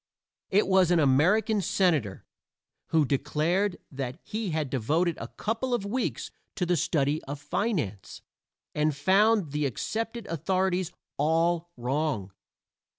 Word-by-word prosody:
It 205 +2 +3
was 190 -2 +4
an 175 -1 +4
American 180 - +3
senator 160 - +1 0.6
who 160 -2 +3
declared 155 +8 0
that 130 -2 -4
he 215 -1 -3
had 155 -5 -2
devoted 155 +7 +1
a - - -4
couple 230 +4 -2
of 210 -4 -3
weeks 240 +5 -2 0.2
to 185 - 0
the 175 0 +2
study 145 0 0
of 140 +1 -6
finance, 150 - -3 0.5
and 150 -1 +1
found 195 +3 +3
the 150 0 0
accepted 225 - -4
authorities 185 +1 0 0.3
all 165 +3 +2
wrong. 125 -5 -1
165 Hz, 125 wpm, -28 LUFS, 145-195 Hz, 0.6 s, was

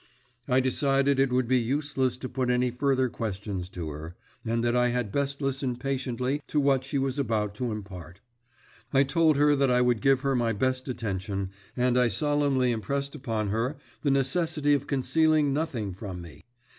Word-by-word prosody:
I 130 0 +3
decided 135 +1 +2
that - - +4
it 135 -2 +2
would 125 -1 +1
be 130 +1 +3
useless 135 +1 0
to 130 - -5
put 130 -1 -2
any 125 0 +2
further 130 +1 +1
questions 100 -5 -4
to 85 -4 -5
her, 80 +4 -8 0.3
and 115 0 -1
that 120 0 +1
I 125 0 +3
had 120 -4 -1
best 140 +2 -2
listen 135 -2 -1
patiently 130 +1 -2
to 150 - 0
what 135 -2 +2
she 140 +2 -2
was 135 0 -1
about 110 -6 0
to 125 0 -2
impart. 95 -4 -8 0.7
I 135 0 +5
told 155 +1 +3
her 145 0 +4
that 135 -1 +2
I 125 0 +3
would 125 -3 +2
give 135 -1 +3
her 135 -1 +1
my 120 -2 +1
best 130 +4 -1
attention, 100 -4 -3 0.3
and 125 0 +3
I 125 - +4
solemnly 140 +1 +1
impressed 140 +5 -2
upon 110 -7 -2
her 115 +7 -1 0.3
the 145 - +1
necessity 145 +2 +1
of 140 0 0
concealing 150 +1 +2
nothing 130 - -2
from 95 -1 -7
me. 85 -3 -13
130 Hz, 185 wpm, -27 LUFS, 115-140 Hz, 0.7 s, I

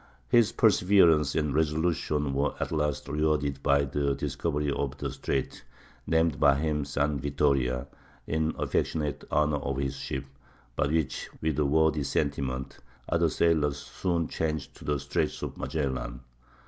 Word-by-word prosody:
His 120 -3 +5
perseverance 90 -9 +4
and 75 -3 0
resolution 75 -2 0
were 70 +2 0
at - - -2
last 75 -2 -1
rewarded 75 -2 0
by 70 0 +3
the 70 0 0
discovery 75 -2 -1
of - - -2
the - - -3
Strait 65 - -3 0.4
named 80 -2 +2
by 70 -2 +5
him 75 0 -1
San 70 +1 0
Vittoria, 70 -2 +1 0.4
in 80 +1 -1
affectionate 75 -3 -1
honor 75 0 +2
of 70 -1 -3
his 70 -1 -2
ship; 65 0 -4 0.5
but - - +1
which, 80 -4 -1
with 75 -1 -1
a 75 - +3
worthy 80 +1 +3
sentiment, 65 -1 -2 0.3
other - - +2
sailors 75 -4 +2
soon 85 +3 -2
changed 75 -3 -3
to - - -12
the 75 -1 0
Straits 70 - -2
of - - -4
Magellan. 65 -4 -3
75 Hz, 145 wpm, -28 LUFS, 70-80 Hz, 0.5 s, His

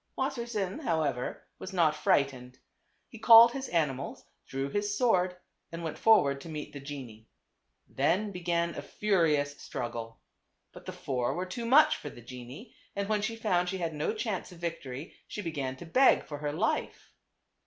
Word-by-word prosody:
Wassersein, 235 -6 -2
however, 155 - -1
was 190 - -7
not 165 -4 +3
frightened. 130 -4 0 0.5
He 225 - -12
called 230 +1 +9
his 270 +1 -5
animals, 140 -5 -1 0.2
drew 135 +1 -3
his 205 +5 -1
sword 185 -7 +2 0.3
and 165 0 -6
went 160 - -5
for 225 -1 +7
ward 140 -1 -2
to 165 - -9
meet 150 -2 -6
the 140 - -7
genie. 130 -6 -9 0.6
Then 190 +10 +1
began 170 -2 -1
a - - -5
furious 155 -8 +1
struggle. 115 -1 -5 0.5
But - - -13
the - - -3
four 125 -3 -2
were 180 +2 -2
too 230 +6 -5
much 290 +6 +6
for 145 - -7
the 120 - -12
genie, 125 - -10 0.2
and 200 0 -2
when 210 -1 +1
she 225 +2 -2
found 180 -6 +1
she 190 - -2
had 165 -3 -2
no 150 0 -1
chance 215 -4 -3
of 175 - -12
victory 165 -3 -5
she 210 - -6
began 140 -6 -3
to 150 - -10
beg 255 +11 +4
for 145 -1 -7
her 145 0 -2
life. 185 +9 -2
170 Hz, 175 wpm, -30 LUFS, 140-205 Hz, 0.6 s, called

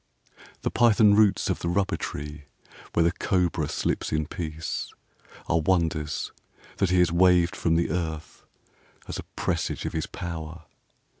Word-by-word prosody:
II - - -20 0.2
The - - 0
python 110 -3 +5
roots 105 -1 +4
of - - -1
the 85 - -2
rubber 95 +2 +1
tree 75 +1 -6 0.5
where 85 - +3
the 85 - +3
cobra 90 -1 0
slips - - -1
in 75 0 0
peace 80 -1 -4 0.6
Are 85 - +2
wonders 80 -3 0 0.5
that 95 - +2
he 90 - +3
has 90 -1 +4
waved 90 +1 +4
from 85 -3 +1
the 85 -1 +1
earth 80 -2 -4 0.6
as - - -5
a - - -5
presage 85 -3 -2
of - - -3
his 80 - -2
power. 85 -2 -6
85 Hz, 155 wpm, -26 LUFS, 80-90 Hz, 0.6 s, python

